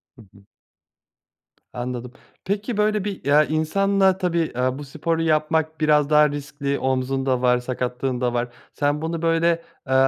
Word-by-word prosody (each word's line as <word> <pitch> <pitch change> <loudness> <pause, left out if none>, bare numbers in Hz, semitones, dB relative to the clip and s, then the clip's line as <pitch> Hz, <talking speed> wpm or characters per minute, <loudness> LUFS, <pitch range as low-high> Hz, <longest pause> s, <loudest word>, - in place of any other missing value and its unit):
Hı 120 - -15
hı. 100 0 -20 1.3
Anladım. 125 0 -5 0.3
Peki 205 +4 -2
böyle 210 -1 +1
bir, 200 -2 -5
eee, 145 +2 +4
insanla 190 +4 +2
tabii, 180 -3 0 0.2
eee, 130 +1 0
bu 145 - -7
sporu 160 +4 -2
yapmak 160 0 0
biraz 150 -1 +3
daha 150 0 +5
riskli 140 -1 -3
omzun 130 0 -1
da 130 -2 +1
var, 125 -1 +4
sakatlığın 125 0 -3
da 120 -1 0
var. 120 0 0 0.3
Sen 145 +1 0
bunu 165 +1 -3
böyle, 165 0 +2 0.4
eee, 130 - 0
150 Hz, 155 wpm, -23 LUFS, 130-165 Hz, 1.3 s, daha